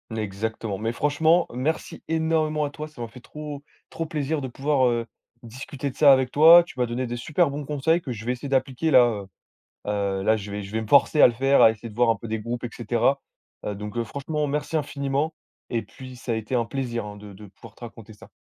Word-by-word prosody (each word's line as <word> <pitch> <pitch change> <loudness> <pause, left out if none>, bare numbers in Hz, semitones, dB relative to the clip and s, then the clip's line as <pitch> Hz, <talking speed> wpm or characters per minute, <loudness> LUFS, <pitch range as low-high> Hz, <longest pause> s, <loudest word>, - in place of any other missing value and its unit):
Exactement, 110 0 -3
mais 110 +3 -2
franchement, 155 +6 +2
merci 140 +6 -3
énormément 160 -2 +1
à 145 - -3
toi, 150 +2 -7
ça 150 -5 -12
m'a 115 - -3
fait 120 +2 -14
trop 150 -1 -8 0.3
trop 165 - -4
plaisir 150 -1 -2
de 130 - -4
pouvoir, 135 0 +1
heu, 115 -1 -1 0.4
discuter 130 +4 -6
de 130 - -11
ça 145 -2 +7
avec 130 -1 +4
toi, 165 +5 +8
tu 170 - -14
m'as 125 - +3
donné 120 +1 -3
des 120 - -4
super 150 +6 +1
bons 145 +1 -5
conseils 150 +4 +1
que 135 - -6
je 110 -1 -7
vais 125 - 0
essayer 135 +3 -7
d'appliquer 135 +3 0
là, 125 -2 +7 0.2
heu, - - -14 0.6
heu, 100 -2 -1
là 110 +2 +3
je 100 -1 -7
vais 105 0 -4
je 95 - -9
vais 110 +1 -2
me 110 - -6
forcer 145 +4 +4
à - - +10
le 120 - +1
faire, 135 +3 +3
à 110 - +8
essayer 110 +2 -9
de 105 - -14
voir 120 0 +3
un 115 - +3
peu 115 +2 -9
des 110 0 -2
groupes 120 +3 -5
et 120 - -2
cetera. 120 +4 0 0.5
Heu 105 - -2
donc, 105 +3 -7
heu, 115 - 0
franchement 150 +4 -3
merci 150 +3 -2
infiniment 145 +1 -2 0.4
et 115 -2 -1
puis 130 -1 -12
ça 120 0 -4
a - - +1
été 110 +3 -4
un 120 - +2
plaisir 120 -3 -3
hein 105 0 -8
de 105 -1 -11
de 105 +2 -12
pouvoir 110 +3 -15
te - - -24
raconter 110 -1 -11
ça. 110 +2 -16
125 Hz, 245 wpm, -24 LUFS, 110-145 Hz, 0.6 s, à